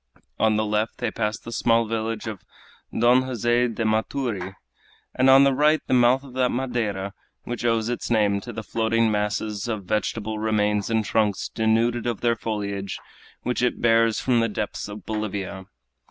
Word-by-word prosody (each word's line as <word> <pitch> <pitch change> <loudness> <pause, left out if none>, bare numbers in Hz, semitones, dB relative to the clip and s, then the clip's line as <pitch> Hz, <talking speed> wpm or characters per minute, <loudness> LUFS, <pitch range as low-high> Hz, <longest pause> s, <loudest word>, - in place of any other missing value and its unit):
On 110 -1 +3
the 110 0 +1
left 105 +1 -1
they - - -2
passed 105 -1 -2
the 115 - -8
small 115 0 +2
village 110 0 -3
of 110 -4 -6 0.5
Don 120 +2 +4
Jose 120 -1 +1
de 115 -1 -3
Maturi, 110 -3 -1 0.6
and 130 +1 +3
on 135 +1 +8
the 140 -1 +4
right 150 +3 +3
the - - -1
mouth 125 +2 +4
of 135 -3 -12
that 130 -1 +1
Madeira 110 -7 -2 0.3
which 120 -1 -5
owes 115 -2 +1
its 120 0 -3
name 105 -3 +2
to 120 - -7
the 110 0 -6
floating 115 0 +1
masses 105 0 -2
of 110 -4 -3
vegetable 110 +1 -2
remains 105 -1 +1
and 110 -1 +1
trunks 105 -3 0
denuded 115 +2 +1
of 120 -4 -2
their 120 -1 +2
foliage 100 -3 -4 0.5
which 125 0 -1
it 125 - 0
bears 115 -1 +3
from 125 -2 +2
the 115 0 +1
depths 105 0 -4
of 105 +1 -9
Bolivia. 100 -3 -4
110 Hz, 175 wpm, -24 LUFS, 105-120 Hz, 0.6 s, on